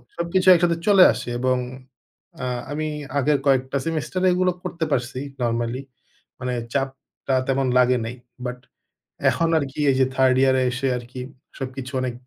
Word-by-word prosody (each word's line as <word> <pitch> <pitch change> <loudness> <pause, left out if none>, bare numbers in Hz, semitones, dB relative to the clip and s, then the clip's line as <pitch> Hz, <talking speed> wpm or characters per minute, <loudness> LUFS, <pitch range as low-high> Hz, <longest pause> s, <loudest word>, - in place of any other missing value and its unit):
সবকিছু 175 +2 0
একসাথে 170 -1 +2
চলে 195 -3 +8
আসে - - -6
এবং 130 0 +2 0.9
আ - - -1 0.3
আমি 155 +1 -2 0.3
আগের 145 +1 +3
কয়েকটা 135 0 +2
সেমেস্টার 165 +3 -2
এগুলো 180 0 +2
করতে 165 -1 -3
পারছি 125 -1 -1 0.2
নরমালি, 120 +2 -1 0.6
মানে 125 -1 -2 0.2
চাপটা 135 0 -3
তেমন 135 0 +1
লাগে 125 0 +4
নাই। 120 +2 -5 0.3
বাট 125 0 -3 0.7
এখন 165 0 +1
আরকি 140 -2 -3
এই - - +1
যে 130 - +5
3rd 130 -1 +4
ইয়ার 130 -1 +4
এ - - +2
এসে 135 +2 -2
আরকি 120 +1 -9 0.4
সবকিছু 130 0 -5
অনেক 130 -1 -2
135 Hz, 150 wpm, -23 LUFS, 125-155 Hz, 0.9 s, চলে